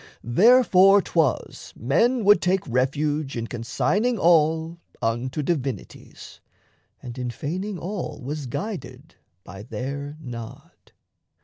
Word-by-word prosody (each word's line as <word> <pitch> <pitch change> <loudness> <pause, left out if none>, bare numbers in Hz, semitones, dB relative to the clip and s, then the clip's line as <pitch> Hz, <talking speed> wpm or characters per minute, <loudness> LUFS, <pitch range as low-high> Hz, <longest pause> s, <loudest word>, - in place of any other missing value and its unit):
Therefore 195 - +6
'twas 165 -8 -1
Men 230 - +2
would 205 +1 +5
take 185 +1 +1
refuge 140 +2 -1
in 115 - -3
consigning 205 - -1
all 165 -1 +2 0.2
Unto 125 +6 -2
divinities, 135 - -5 0.6
and 125 0 -8
in 125 -1 -3
feigning 180 - -4
all 175 -4 -5
Was 145 +1 -5
guided 200 - -6 0.3
by 95 +2 -10
their 140 +7 -6
nod. 120 -6 -10
150 Hz, 105 wpm, -24 LUFS, 125-185 Hz, 0.6 s, Therefore